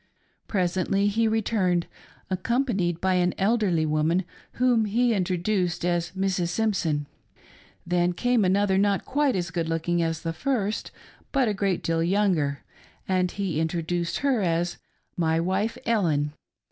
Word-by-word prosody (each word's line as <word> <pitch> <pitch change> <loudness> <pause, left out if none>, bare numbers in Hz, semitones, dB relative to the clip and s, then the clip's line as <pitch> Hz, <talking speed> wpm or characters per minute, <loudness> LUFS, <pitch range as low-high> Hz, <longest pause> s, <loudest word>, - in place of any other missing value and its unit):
Presently 190 +1 0
he 225 +2 +1
returned 200 -5 +1 0.5
accompanied 190 -4 0
by 190 +1 +1
an 180 -1 +1
elderly 195 -6 +2
woman 155 +4 +1 0.3
whom 245 -3 +2
he 235 +3 +2
introduced 180 -2 0
as 175 -1 0
Mrs. 190 -2 0
Simpson. 175 -8 0 0.8
Then 175 0 +1
came 245 +3 +2
another, 190 +1 +2
not 200 -1 +1
quite 285 -1 +1
as 175 -2 -2
good 165 -1 -2
looking 165 +1 0
as 165 -1 -2
the 165 - -2
first, 215 - -1 0.4
but 270 -3 +2
a 215 - +1
great 195 -3 -1
deal 165 0 0
younger, 170 -6 +1 0.4
and 185 -1 +1
he 185 -5 -2
introduced 170 +1 -1
her 265 -5 +2
as 175 -1 0 0.2
" - - -47
My 160 0 +2
wife 195 +7 -1
Ellen. 160 -10 +1
185 Hz, 140 wpm, -26 LUFS, 170-210 Hz, 0.8 s, elderly